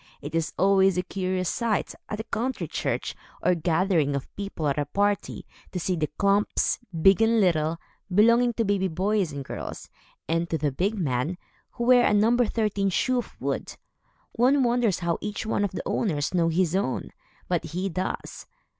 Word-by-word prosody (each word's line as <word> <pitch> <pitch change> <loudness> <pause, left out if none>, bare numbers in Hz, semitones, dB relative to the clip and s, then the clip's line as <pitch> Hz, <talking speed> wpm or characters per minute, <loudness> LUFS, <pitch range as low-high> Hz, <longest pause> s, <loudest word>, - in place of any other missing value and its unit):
It 145 - -8
is 165 -1 0
always 195 0 +4
a 180 - +1
curious 185 -1 -2
sight, 230 +4 -1 0.2
at 210 - -4
a - - -2
country 250 +4 -3
church, - - -2 0.3
or - - +4
gathering 165 -3 +1
of 140 - -6
people 195 -6 -3
at 140 +1 0
a 145 - 0
party, 205 +4 -1 0.3
to 180 - -2
see 180 +2 -1
the 155 -2 -1
klomps, 200 +1 +2 0.2
big 195 +2 +6
and 225 0 +4
little, 165 -4 +2 0.3
belonging 235 +5 +4
to 230 0 0
baby 200 -1 +1
boys 190 +1 0
and 140 -1 -6
girls, - - -7 0.4
and 165 +1 0
to 160 - 0
the 145 -1 0
big 195 +10 -1
men, 150 +1 -1 0.4
who 235 - -4
wear 245 0 +6
a 210 - +3
number 230 +3 +3
thirteen 210 -3 0
shoe 255 +7 +1
of 240 - -8
wood. - - -3 0.6
One 260 +3 +3
wonders 235 -6 +1
how 170 -1 0
each 210 +1 -4
one 220 -2 0
of 205 - +1
the - - -5
owners 150 -9 -1
knows 165 -2 +2
his 180 -1 +2
own, 190 -10 -1 0.4
but - - -1
he 180 +5 -3
does. 185 +1 -4
190 Hz, 180 wpm, -26 LUFS, 165-215 Hz, 0.6 s, big